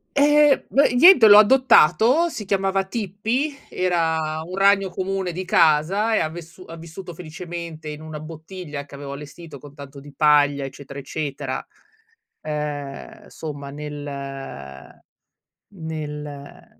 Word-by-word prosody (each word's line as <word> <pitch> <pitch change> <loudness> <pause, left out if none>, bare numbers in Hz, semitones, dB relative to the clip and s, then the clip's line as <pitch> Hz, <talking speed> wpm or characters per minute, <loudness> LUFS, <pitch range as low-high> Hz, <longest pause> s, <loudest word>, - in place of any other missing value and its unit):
Ehm, 295 0 +4
beh, 275 -2 +2
niente 265 - +8
l'ho 205 0 +9
adottato, 255 - +5
si 215 - -6
chiamava 195 0 0
"Tippi", 225 - -3
era 160 -3 -1
un 180 +3 -8
ragno 195 -1 +3
comune 190 0 -3
di 185 +2 -5
casa 185 +7 +3
e - - +2
ha 155 - -1
vessu 170 +2 -11
ha 165 - -9
vissuto 170 +2 -10
felicemente 165 -1 -8
in 150 0 -8
1 155 -1 -8
bottiglia 155 -1 -8
che 140 - -13
avevo 140 0 -8
allestito 145 +1 -10
con 145 -1 -14
tanto 140 -1 -11
di 145 +1 -13
paglia, 145 -2 +3
eccetera, 135 +1 -10
eccetera. 140 -2 -5 0.8
Ehm, 150 -2 -6
somma, 145 -3 -8
nel, 150 0 -7
ehm 135 - -9 0.7
nel, 155 -3 -6
ehm, 145 -1 -12
160 Hz, 135 wpm, -22 LUFS, 145-195 Hz, 0.8 s, l'ho